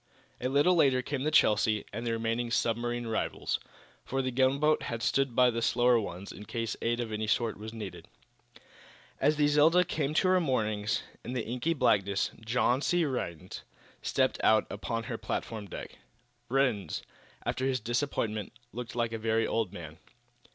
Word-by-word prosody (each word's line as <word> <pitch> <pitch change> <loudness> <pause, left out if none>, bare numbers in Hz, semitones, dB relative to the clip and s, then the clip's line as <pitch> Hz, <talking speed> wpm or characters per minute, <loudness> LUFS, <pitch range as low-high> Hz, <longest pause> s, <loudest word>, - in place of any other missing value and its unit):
A 125 - 0
little 145 +7 +4
later 135 -6 +4
came 140 +1 -3
the 150 - +1
"Chelsea" 105 -7 +3
and 115 +3 -4
the - - +1
remaining 115 +1 -1
submarine 120 +1 0
rivals, 110 -1 -1 0.4
for 135 0 -2
the 130 - -1
gunboat 135 +4 +3
had 115 -1 -4
stood 135 -3 +1
by 125 -1 +5
the 115 0 -2
slower 120 0 +4
ones 95 -2 -6
in 105 - -10
case 115 0 -3
aid 120 +1 0
of 115 -2 -3
any 110 0 -2
sort 115 +1 +1
was 110 +2 -8
needed. 110 -4 -8 1.1
As 150 +3 +3
the 150 0 +3
"Zelda" 155 +5 +5
came 155 -3 -2
to 185 - +3
her 185 0 +4
moorings 105 -7 0 0.2
in 120 - -5
the 125 -3 -2
inky 125 +8 -1
blackness 100 -7 +2
John 125 +3 +2
C. 175 +2 +2
Rhinds 90 - -4 0.4
stepped - - 0
out 110 0 +5
upon 115 +3 -3
her - - -5
platform 110 -3 -4
deck. - - -8 0.5
Rhinds, 125 -7 0 0.4
after 130 - 0
his 130 -1 +1
disappointment, 115 -3 -2 0.2
looked 120 -1 -6
like 120 -1 0
a 115 - -4
very 110 0 +1
old 110 -5 -1
man. 80 -4 -9
120 Hz, 170 wpm, -30 LUFS, 110-135 Hz, 1.1 s, by